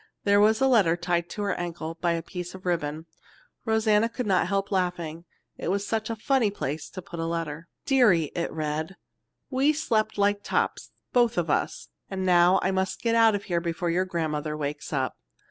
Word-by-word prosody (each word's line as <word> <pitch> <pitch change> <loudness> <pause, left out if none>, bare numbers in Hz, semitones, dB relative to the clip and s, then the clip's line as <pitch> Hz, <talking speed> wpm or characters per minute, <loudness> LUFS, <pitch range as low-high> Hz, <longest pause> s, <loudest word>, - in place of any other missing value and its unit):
There 200 0 +4
was 215 +1 +4
a 270 - +3
letter 200 -10 +4
tied 175 0 -1
to 210 - -4
her 200 -2 0
ankle 170 -2 -4
by 170 -1 +2
a 165 -1 -3
piece 180 -1 -7
of 185 - -12
ribbon. 160 -3 -2 0.6
Rosanna 220 0 +3
could 250 +1 -4
not 190 -4 +2
help 195 +1 -1
laughing, 175 -3 -2 0.3
it - - -3
was 200 +2 0
such 220 +1 -2
a 230 - -2
funny 235 0 +2
place 150 -6 -4
to 185 - -8
put 170 -1 -8
a 165 - -1
letter. 165 -1 -4 0.2
"Dearie," 215 - +4
it 170 - -2
read, 155 +3 -3 0.6
"we 275 +3 +3
slept 220 -9 0
like 205 0 +2
tops - - -1 0.2
both 240 -3 +3
of 165 -3 +1
us, - - -1 0.2
and 190 -1 -3
now 180 +1 +5
I 190 - +2
must 190 0 -2
get 230 -1 +2
out 225 -2 +5
of 200 - -3
here 175 -4 -1
before 170 0 -2
your 185 +2 +1
grandmother 155 -4 -2
wakes 150 0 -4
up. 130 -5 -2
180 Hz, 195 wpm, -26 LUFS, 165-210 Hz, 0.6 s, now